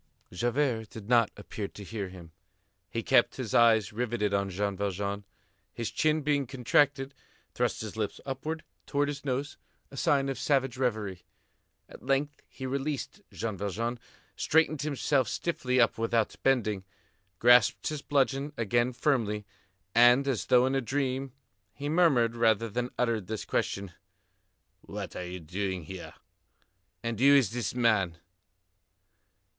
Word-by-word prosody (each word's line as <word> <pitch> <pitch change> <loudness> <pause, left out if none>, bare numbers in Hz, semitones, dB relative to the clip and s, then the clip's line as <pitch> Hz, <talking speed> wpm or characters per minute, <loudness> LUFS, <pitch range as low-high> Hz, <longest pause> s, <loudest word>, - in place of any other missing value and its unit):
Javert 120 +1 0
did 105 -2 -10
not 120 -2 +4
appear 105 0 -5
to 100 - -11
hear 100 -1 -5
him. 90 -3 -12 0.6
He 115 - -3
kept 120 - +4
his 125 -6 -5
eyes 110 -4 +5
riveted 110 -3 -1
on 100 0 +1
Jean 100 +1 -2
Valjean. 100 +1 -3 0.5
His 115 - -3
chin 155 0 +1
being 145 -2 +1
contracted, 135 +2 +1 0.4
thrust - - -1
his - - -6
lips - - -3
upwards 150 +4 -4 0.2
towards 145 0 +1
his 140 0 -8
nose, 140 +2 -2 0.3
a 135 - -10
sign 145 -4 +2
of 135 - -3
savage 135 -4 +1
reverie. 110 -8 -2 0.7
At - - -13
length 140 +2 0
he 130 - -8
released 140 +2 -3
Jean 110 -2 -4
Valjean, 115 +5 -2 0.4
straightened 160 -2 +2
himself 140 -3 +1
stiffly 130 -2 -1
up 115 -2 +3
without 115 -1 +1
bending, 110 -7 +1 0.5
grasped 120 0 +5
his 150 -2 -4
bludgeon 140 +1 0
again 120 +3 +1
firmly, 115 -5 0 0.5
and, 120 +4 +6
as 115 -10 -1
though 125 -1 +5
in 130 - 0
a 135 - +1
dream, 135 +1 -2 0.4
he 145 +1 -4
murmured 140 -9 +3
rather 115 -1 +2
than 120 +3 -2
uttered 115 -6 0
this 110 0 -4
question: 100 -2 -2 0.9
"What - - -7
are 90 - -5
you 90 +1 -6
doing 95 +2 -3
here? 90 +3 -9 0.9
And 115 -2 -3
who 140 +2 +7
is 130 -9 +4
this 120 -1 -3
man?" 105 -8 +2
120 Hz, 145 wpm, -29 LUFS, 105-135 Hz, 0.9 s, who